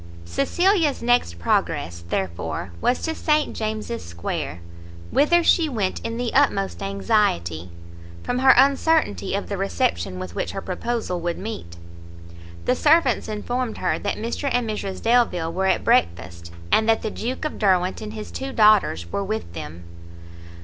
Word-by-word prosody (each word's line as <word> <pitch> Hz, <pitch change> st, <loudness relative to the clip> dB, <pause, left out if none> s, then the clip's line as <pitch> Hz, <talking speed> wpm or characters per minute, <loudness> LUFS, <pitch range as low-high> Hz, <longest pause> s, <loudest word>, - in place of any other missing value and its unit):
Cecilia's 315 Hz, -, +1 dB
next 240 Hz, -, +2 dB
progress, 85 Hz, 0 st, -1 dB
therefore, 90 Hz, -1 st, -3 dB
was 250 Hz, -, +1 dB
to 320 Hz, -, -1 dB
St 305 Hz, -1 st, 0 dB
James's 215 Hz, -, -3 dB
square, 85 Hz, -1 st, -5 dB, 0.5 s
whither 345 Hz, +4 st, +4 dB
she 330 Hz, -1 st, +4 dB
went 205 Hz, -8 st, -1 dB
in 230 Hz, 0 st, -4 dB
the 245 Hz, -1 st, -2 dB
utmost 200 Hz, -10 st, +2 dB
anxiety, 195 Hz, -, 0 dB, 0.5 s
from 250 Hz, -, -1 dB
her 265 Hz, 0 st, +7 dB
uncertainty 275 Hz, -, +3 dB
of -, -, -3 dB
the -, -, -3 dB
reception 85 Hz, -1 st, -1 dB
with 90 Hz, -1 st, -6 dB
which 85 Hz, -, -3 dB
her -, -, -3 dB
proposal 195 Hz, -1 st, -3 dB
would 170 Hz, 0 st, -2 dB
meet. 190 Hz, -, -7 dB, 0.9 s
The 250 Hz, -, +3 dB
servants 300 Hz, -2 st, +3 dB
informed 230 Hz, +3 st, -3 dB
her -, -, 0 dB
that 200 Hz, -, -2 dB
Mr 235 Hz, +5 st, -2 dB
and 245 Hz, -1 st, +1 dB
Mrs 200 Hz, -3 st, -4 dB
Delvile 225 Hz, -9 st, +2 dB
were 190 Hz, +2 st, 0 dB
at 190 Hz, -, +1 dB
breakfast, 85 Hz, 0 st, 0 dB, 0.2 s
and 220 Hz, +1 st, +3 dB
that 225 Hz, -, +3 dB
the 220 Hz, -, -2 dB
Duke 250 Hz, +8 st, -4 dB
of 305 Hz, -, -4 dB
Derwent 185 Hz, -3 st, +2 dB
and 215 Hz, 0 st, -6 dB
his 215 Hz, -1 st, -7 dB
two 270 Hz, 0 st, -5 dB
daughters 210 Hz, -, +3 dB
were 200 Hz, -, -1 dB
with 195 Hz, -, -4 dB
them. 80 Hz, +3 st, -8 dB
210 Hz, 155 wpm, -23 LUFS, -, 0.9 s, her